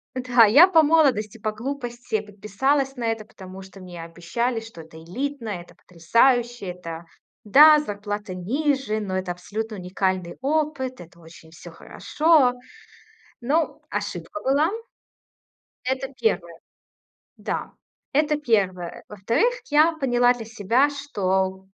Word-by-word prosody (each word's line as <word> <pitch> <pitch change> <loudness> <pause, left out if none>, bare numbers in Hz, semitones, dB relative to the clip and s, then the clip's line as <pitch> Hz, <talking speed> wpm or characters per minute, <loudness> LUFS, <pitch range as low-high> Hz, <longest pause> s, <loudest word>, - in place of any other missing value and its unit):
Да, 250 -2 +4
я 280 - +8
по 330 -4 +5
молодости, 275 -9 +2
по 215 0 -2
глупости 240 -1 -4
подписалась 240 +7 -1
на 245 - -5
это, 225 -1 -2
потому 190 -2 -12
что 190 +1 -14
мне 175 -2 -9
обещали, 180 +9 -3
что 225 -6 -12
это 160 0 -14
элитно, 255 - -5
это 175 -3 -7
потрясающе, 235 +6 +1
это 170 -2 -7 0.4
Да, 300 +8 +8
зарплата 205 -6 -5
ниже, 260 - -1
но 190 -3 -3
это 185 -1 -2
абсолютно 210 +6 -6
уникальный 185 -1 -2
опыт, 280 -3 -1
это 170 0 -14
очень 160 -1 -16
всё 165 - -12
хорошо. 305 -5 +2 0.9
Ну, 305 +7 0
ошибка 310 - -5
была. 285 +5 +2 1.2
Это 265 +1 -2
1. 185 -9 -1 0.8
Да, - - -4 0.4
это 300 +1 +2
1. 195 - -1
Во-вторых, 230 - 0 0.2
я 305 +3 +4
поняла 245 -3 +3
для 235 -2 -8
себя, 235 +5 +1
что, 190 -9 -2
225 Hz, 125 wpm, -23 LUFS, 190-270 Hz, 1.2 s, я